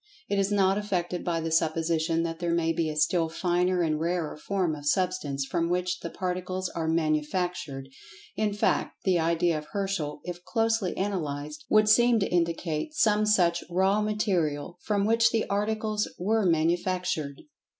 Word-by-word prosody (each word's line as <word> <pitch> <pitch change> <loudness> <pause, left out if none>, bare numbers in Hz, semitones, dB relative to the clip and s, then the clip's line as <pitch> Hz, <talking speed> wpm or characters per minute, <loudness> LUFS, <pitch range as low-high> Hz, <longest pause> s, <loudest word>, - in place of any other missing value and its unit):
It 200 - 0
is 195 +1 +1
not 195 -1 +3
affected 180 -4 -2
by 165 -2 -1
the 165 0 -3
supposition 165 0 +1
that 165 -1 -4
there 170 -1 0
may 165 -1 +1
be 160 -1 -1
a 155 - -4
still 160 +2 +2
finer 180 +1 +1
and 155 -2 0
rarer 170 -1 -1
form 180 +1 -1
of 145 -1 -6
Substance, 150 -6 0
from 170 +3 -1
which 180 +1 -1
the 170 - -5
Particles 185 +1 -3
are 165 -1 -3
"manufactured"—in 160 +3 -2
fact, 205 - 0
the 185 -3 +2
idea 165 0 +1
of 150 - -12
Herschel, 195 -8 -2
if 175 0 -7
closely 225 -4 0
analyzed, 150 -7 -3
would 215 0 +5
seem 240 +2 +5
to 195 - 0
indicate 170 - -1
some 215 -5 +3
such 175 -5 +3
"raw 190 +4 +2
material" 180 -7 -1
from 205 -2 0
which 230 +1 +4
the 225 -1 0
articles 215 +1 0
were 210 +2 +1
manufactured. 170 -2 0
175 Hz, 160 wpm, -27 LUFS, 160-200 Hz, -, would